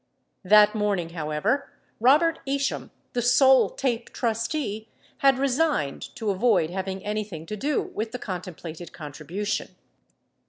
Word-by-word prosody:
34 185 - -14 0.2
That 210 - -12
morning, 200 -5 0
however, 165 - -1 0.3
Robert 305 +8 +4
Isham, 275 0 -1 0.2
the 245 - 0
sole 260 +2 +5
TAPE 240 -3 -2
trustee, 225 -1 -2 0.3
had 275 -1 +5
resigned 275 - +1
to 220 -3 -1
avoid 190 -5 +2
having 190 +1 -4
anything 205 -6 -4
to 215 - -5
do 285 +7 0
with 220 +1 -5
the 250 - -4
contemplated 175 -5 -7
contribution. 160 +7 -4
215 Hz, 125 wpm, -25 LUFS, 180-260 Hz, 0.3 s, sole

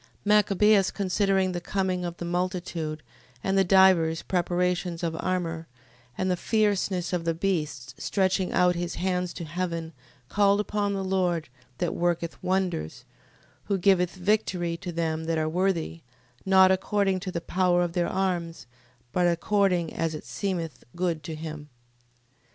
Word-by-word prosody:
Machabeus 210 -1 +4
considering 195 -1 +1
the 175 -1 -4
coming 185 -1 -1
of 175 -1 -4
the 175 - -5
multitude, 175 -3 -3 0.4
and 195 - 0
the 195 - +5
divers 180 -4 +4
preparations 180 -1 -1
of 165 -1 -1
armour, 165 -3 -2 0.5
and 185 0 0
the - - +2
fierceness 200 -3 0
of 175 -2 0
the 165 -1 0
beasts, 150 -9 -2
stretching 190 -1 +1
out 180 0 +4
his 175 0 -3
hands 180 -1 -1
to - - -7
heaven, 170 0 -3 0.3
called 200 +3 +3
upon 205 -1 -1
the 195 - -2
Lord, 180 -5 0 0.3
that 175 - -1
worketh 170 -1 -1
wonders, 185 - -2 0.6
who 200 -1 0
giveth 180 -1 +3
victory 185 -3 0
to 175 0 -6
them 160 -1 -2
that 165 0 0
are 155 0 0
worthy, 170 -1 -1 0.5
not 190 -1 +6
according 195 0 +1
to 185 0 -5
the 170 - -2
power 175 0 +2
of 175 -1 -3
their 175 -1 +1
arms, 175 -6 -2 0.5
but 180 +4 +2
according 180 -1 +1
as 165 -1 -1
it 150 - -8
seemeth 170 -8 -4
good 175 -3 -1
to 155 +2 -6
him. 155 -1 -7
180 Hz, 150 wpm, -27 LUFS, 165-190 Hz, 0.6 s, not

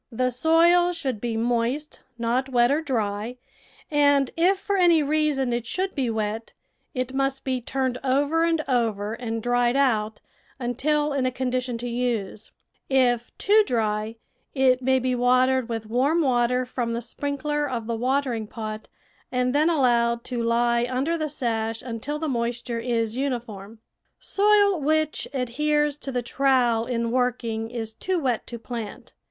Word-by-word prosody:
The 255 +2 0
soil 335 +6 +4
should 265 -10 -3
be 235 -2 -2
moist, 240 +6 -1 0.2
not 240 +3 0
wet 240 0 +3
or 295 +3 +2
dry, 225 -4 -2 0.5
and 285 -2 +3
if 360 +4 +3
for 400 +1 -2
any 345 -4 +4
reason 290 -4 +1
it 240 -1 -3
should 375 +6 -2
be 265 -5 -1
wet, 220 0 -3 0.4
it 255 0 -2
must 270 0 -1
be 260 -2 -1
turned 260 0 -2
over 285 +5 +2
and 330 -2 +1
over 220 -5 0
and 225 -2 -4
dried 245 0 +2
out 220 -6 +1 0.4
until 290 +4 0
in 265 -2 +1
a - - 0
con 255 0 -2
dition 250 -1 -2
to 240 +1 -5
use; 235 -4 -2 0.4
if 245 -3 +2
too 425 +2 +4
dry, 215 -2 -1 0.4
it 260 -1 +3
may 260 +1 +3
be 255 0 0
watered 255 0 +2
with 225 -1 -3
warm 270 +9 +1
water 250 -1 +2
from 240 -2 -3
the 230 - -1
sprinkler 285 +4 -2
of 235 -3 -3
the 230 0 -2
watering 250 -2 -1
pot 215 0 -6 0.4
and 250 0 0
then 305 +3 +3
allowed 235 -6 +2
to 245 -2 -3
lie 235 +1 +2
under 270 +6 0
the 310 -2 -2
sash 225 -5 -2
until 250 +5 -4
the 315 +1 -3
moisture 235 -2 -2
is 230 -1 -1
uniform. 230 -6 -4 0.4
Soil 405 -3 +3
which 310 +1 0
adheres 295 +3 0
to 280 -2 -6
the 245 -1 -2
trowel 245 -3 +2
in 235 -2 -1
working 235 -3 -1
is 225 -2 -5
too 370 +10 -2
wet 255 -8 -1
to 235 - -6
plant. 230 -2 -7
250 Hz, 160 wpm, -24 LUFS, 235-280 Hz, 0.5 s, soil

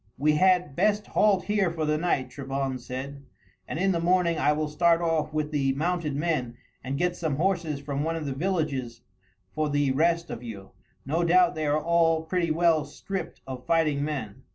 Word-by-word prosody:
"We 150 +3 +3
had 180 -2 +3
best 210 0 +2
halt 205 -3 +2
here 205 -3 +1
for 160 -2 -3
the 150 0 +1
night," 155 -6 -1
Trebon 135 -1 -3
said, 130 +3 -7 0.5
"and - - -4
in 195 +3 +2
the 170 - 0
morning 170 -1 +2
I 150 - +3
will 155 0 -1
start 165 +2 +3
off 165 -3 0
with 155 0 -2
the 135 -3 +1
mounted 160 0 -1
men 140 -6 -1 0.3
and 135 +2 -3
get 175 +2 0
some 160 -5 -2
horses 165 -3 0
from 140 0 -3
one 165 +1 -1
of 160 -2 -4
the 140 - -2
villages 140 -8 -2 0.5
for 155 -1 -1
the 145 -2 +1
rest 170 +4 +1
of - - -6
you. 105 -5 -9 0.3
No 160 +6 0
doubt 175 +1 +4
they 155 -1 -2
are 150 +1 +2
all 165 0 +2
pretty 170 +1 -1
well 160 -1 +3
stripped 190 0 -6
of 130 -1 -8
fighting 155 -4 +2
men." 135 -9 -4
155 Hz, 195 wpm, -26 LUFS, 140-170 Hz, 0.5 s, doubt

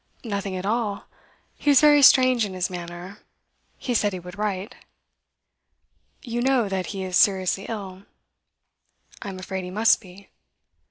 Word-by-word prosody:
'Nothing 200 -4 -4
at 185 - -5
all. 210 -1 -2 0.5
He 290 - -2
was 280 -3 +7
very 295 -1 +6
strange 255 -3 +6
in 195 -3 -4
his 185 0 -2
manner. 175 +3 -8 0.6
He 250 - -3
said 205 -3 +1
he 185 - -5
would 180 +1 -11
write.' 205 +2 -3 1.5
'You 240 -2 -3
know 255 -3 +2
that 190 -2 -3
he 195 -2 -5
is 185 -1 -4
seriously 190 0 +2
ill?' 195 -3 -7 1.2
'I 205 - -6
am 190 - -7
afraid 190 0 -5
he 180 - -7
must 215 +5 +3
be. 195 0 -16
200 Hz, 155 wpm, -24 LUFS, 185-230 Hz, 1.5 s, was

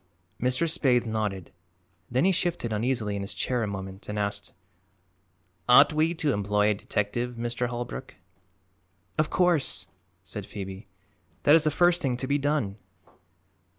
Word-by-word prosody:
Mr. 130 +7 +2
Spaythe 130 -6 +2
nodded. 105 -5 -3 0.6
Then 130 +7 +2
he 195 - +5
shifted 175 -10 -1
uneasily 110 -2 0
in 100 - -3
his 100 - -4
chair 125 -2 0
a 110 - 0
moment 95 0 -7
and 105 - -3
asked: 100 0 -2 1.2
"Ought 140 +5 +8
we 160 +3 +2
to 150 -4 +1
employ 105 +1 +2
a - - +3
detective, 110 +4 -2
Mr. 120 +1 -2
Holbrook?" 120 +2 -6 1.0
"Of 155 - +2
course!" 175 -6 +2 0.4
said - - -7
Phoebe. 95 0 -7 0.6
"That 145 - +6
is 160 -1 +6
the - - +4
first 175 +3 +3
thing 125 -3 0
to 130 - -3
be 140 +2 +1
done." 140 -9 0
120 Hz, 150 wpm, -27 LUFS, 105-145 Hz, 1.2 s, Ought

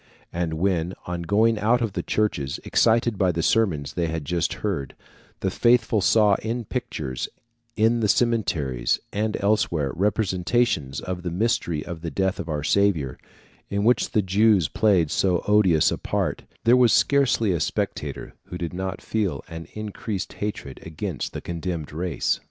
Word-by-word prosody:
And 85 -2 -2
when, 90 0 0
on 90 -1 -4
going 110 +5 +2
out 115 +4 +3
of 115 -5 -2
the - - -2
churches, 70 -11 -1
excited 115 -1 +2
by 95 -2 +3
the 85 -1 -2
sermons 85 -12 +1
they 85 -1 -1
had 80 -2 -4
just 85 +1 0
heard, 80 -11 -2 0.5
the 95 - 0
faithful 115 -1 +3
saw 105 +1 +4
in 115 +1 -3
pictures, 75 - -4 0.5
in 115 +2 +3
the 110 - +1
cemeteries, 90 - +1
and 105 +1 -1
elsewhere, 90 -9 +1
representations 95 - 0
of 90 -1 -4
the 90 - -3
mystery 85 -5 -1
of 85 -2 -7
the 85 - -3
death 95 +4 -1
of 85 - -5
our 75 -2 -2
Saviour, 80 -8 +1 0.5
in 100 0 -1
which 120 +1 +3
the 105 - +1
Jews 100 -2 +3
played 95 -8 +2
so 90 -3 +1
odious 100 -7 +4
a - - -3
part, - - -2 0.2
there 115 +2 +6
was 125 -3 +5
scarcely 135 -7 +3
a 85 - 0
spectator - - -3
who 90 - -7
did 85 -2 -4
not 95 +1 -4
feel 105 -4 -1
an 80 0 -8
increased 105 -1 -5
hatred 105 -10 -5
against 80 -2 -4
the - - -6
condemned 85 -3 -4
race. 85 +2 -1
95 Hz, 165 wpm, -24 LUFS, 85-110 Hz, 0.5 s, there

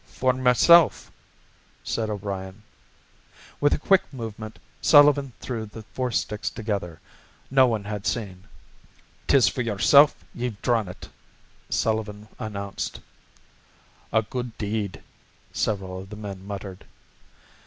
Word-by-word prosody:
"For 130 0 +1
myself," 130 +7 +5 0.7
said 110 -1 -2
O'Brien. 100 0 -5 1.0
With 145 - +3
a - - -1
quick 195 +5 +4
movement, 110 -4 -7 0.2
Sullivan 145 -2 +6
threw 115 -4 -4
the 110 +2 -10
four 130 -1 -1
sticks 105 -2 -2
together. 100 -7 -4 0.5
No 130 -1 +6
one 110 -4 -1
had 105 0 -4
seen. 95 -6 -3 0.8
"'Tis 135 -3 +5
for 125 - -1
yourself 125 +7 +5 0.2
ye've 120 -4 -4
drawn 115 -5 +1
it," 90 - -10 0.6
Sullivan 110 -1 -1
announced. 100 -4 -5 1.1
"A 110 0 +3
good 125 0 -5
deed," 105 -5 -3 0.5
several 95 -3 -2
of 95 0 -10
the 105 - -8
men 100 -2 -8
muttered. 100 -2 -7
110 Hz, 115 wpm, -25 LUFS, 100-125 Hz, 1.1 s, Sullivan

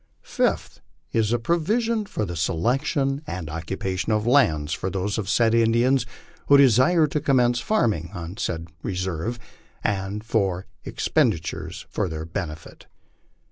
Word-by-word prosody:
Fifth. - - -1 0.3
Is 110 -1 +1
a 120 - +3
provision 210 - 0
for 110 - -2
the 85 -2 -5
selection 135 - 0
and 85 - -5
occupation 95 +5 -3
of 105 0 +1
lands 80 - +3
for 95 - -2
those 100 +2 -2
of 100 -2 -4
said 115 0 +3
Indians 115 +3 +3 0.4
who 140 - +7
desire 140 +6 +5
to 150 0 -1
commence 125 -4 +3
farming 110 - 0
on 90 0 -7
said 85 -8 -3
reserve, 95 +4 -3 0.5
and 100 +1 -2
for 100 -5 0 0.2
expendi 80 - +1
tures 85 +2 -6
for 95 - -1
their 80 0 -5
benefit. 80 -2 -7
105 Hz, 140 wpm, -24 LUFS, 90-130 Hz, 0.5 s, who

